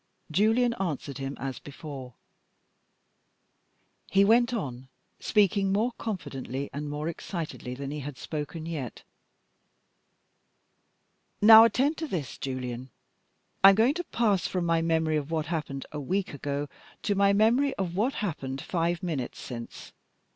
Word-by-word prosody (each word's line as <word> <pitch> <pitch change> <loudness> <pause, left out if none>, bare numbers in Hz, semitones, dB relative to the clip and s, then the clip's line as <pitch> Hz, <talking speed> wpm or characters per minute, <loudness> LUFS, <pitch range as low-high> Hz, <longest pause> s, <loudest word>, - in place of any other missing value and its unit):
Julian 225 +7 +3
answered 150 -6 -3
him 135 +1 -4
as 135 +1 -4
before. 140 -4 -9 1.9
He 195 +1 +5
went 240 +3 +4
on, 130 - -4 0.3
speaking 200 -2 +2
more 220 +5 +2
confidently 140 - -4
and 145 +1 -4
more 150 +2 -3
excitedly 160 -6 -5
than 140 +1 -5
he 150 - -4
had 145 -1 -6
spoken 155 +1 -5
yet. 150 -8 -5 2.4
"Now 220 +1 +10
attend 275 +6 +2
to 320 - -3
this, 150 - -4
Julian. 130 -1 -4 0.7
I 195 - +12
am 195 - +5
going 230 +6 +4
to 350 +3 -3
pass 210 -9 +1
from 180 -2 -1
my 165 -1 +2
memory 160 -1 +1
of 145 0 -3
what 160 -2 -1
happened 150 -4 -3
a 150 - -5
week 185 +7 -2
ago 145 0 -3 0.4
to 205 - +1
my 200 0 +4
memory 235 +7 +3
of 180 -3 -3
what 230 +8 +1
happened 135 -7 -4
five 170 +3 -1
minutes 150 -8 -3
since. 115 -2 -8
165 Hz, 140 wpm, -28 LUFS, 140-205 Hz, 2.4 s, I